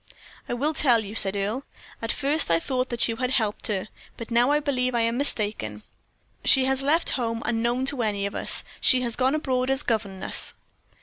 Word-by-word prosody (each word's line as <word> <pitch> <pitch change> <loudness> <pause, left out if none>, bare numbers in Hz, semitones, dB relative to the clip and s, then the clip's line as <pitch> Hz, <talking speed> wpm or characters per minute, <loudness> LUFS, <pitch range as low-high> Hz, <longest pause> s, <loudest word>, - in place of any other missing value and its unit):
"I - - -1
will 295 +6 0
tell 240 -8 +3
you," 200 - -8
said 200 -3 +3
Earle. 205 +6 -2 0.4
"At 225 - -1
first 290 - +2
I 165 - +4
thought 255 +7 -2
that 240 -1 +1
you 225 -1 -3
had 250 0 -1
helped 220 -5 0
her, 200 -2 -2 0.3
but 230 0 -8
now 240 +3 +3
I 295 +1 +3
believe 255 -4 -1
I 235 - +2
am 230 +1 +1
mistaken. 210 - -1 0.6
She 265 -1 +6
has 265 0 0
left 305 +5 +2
home 230 -2 -2
unknown 235 +3 0
to 275 -2 -2
any 205 -3 -1
of 200 - -4
us. - - -2 0.2
She 255 -1 +4
has 240 -2 -2
gone 260 +3 +1
abroad 255 -4 -1
as 270 +2 +1
governess." 205 -5 -1
240 Hz, 200 wpm, -25 LUFS, 220-265 Hz, 0.6 s, She